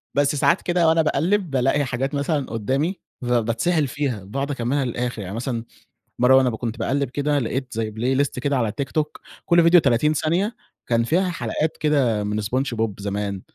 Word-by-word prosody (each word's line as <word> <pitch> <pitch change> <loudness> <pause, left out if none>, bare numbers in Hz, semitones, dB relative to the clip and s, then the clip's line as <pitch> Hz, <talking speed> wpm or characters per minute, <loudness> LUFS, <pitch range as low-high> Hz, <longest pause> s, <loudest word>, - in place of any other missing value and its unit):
بس 145 +1 +2
ساعات 170 +5 +2
كده 175 -2 +2
وأنا 160 0 +4
باقلِّب 175 +5 +1
بالاقي 135 +2 +2
حاجات 135 +3 -2
مثلًا 140 -1 0
قُدامي 135 - -1 0.2
فبتسحل 120 +7 +1
فيها، 125 -8 -3
باقعد 135 +8 -3
أكملها 135 +1 -1
للآخر. 120 -2 -3
يعني 95 +2 -6
مثلًا 115 -1 -3 0.6
مرة 125 +2 +6
وأنا 130 -1 +5
ب 110 - -3
كنت 115 -1 -5
باقلِّب 140 -1 0
كده 145 +1 0
لقيت 125 +1 -3
زي 110 -1 -2
playlist 130 +5 0
كده 140 0 0
على 110 -4 0
TikTok، 150 +2 -2 0.2
كل 170 -2 +5
فيديو 170 +1 +7
30 140 +2 +2
ثانية، 175 +9 0 0.3
كان 115 -1 +2
فيها 180 +8 +1
حلقات 155 +1 -2
كده 130 -9 +1
من 105 +1 -2
SpongeBob 115 0 -1
زمان. 100 -1 -3
135 Hz, 175 wpm, -22 LUFS, 115-150 Hz, 0.6 s, فيديو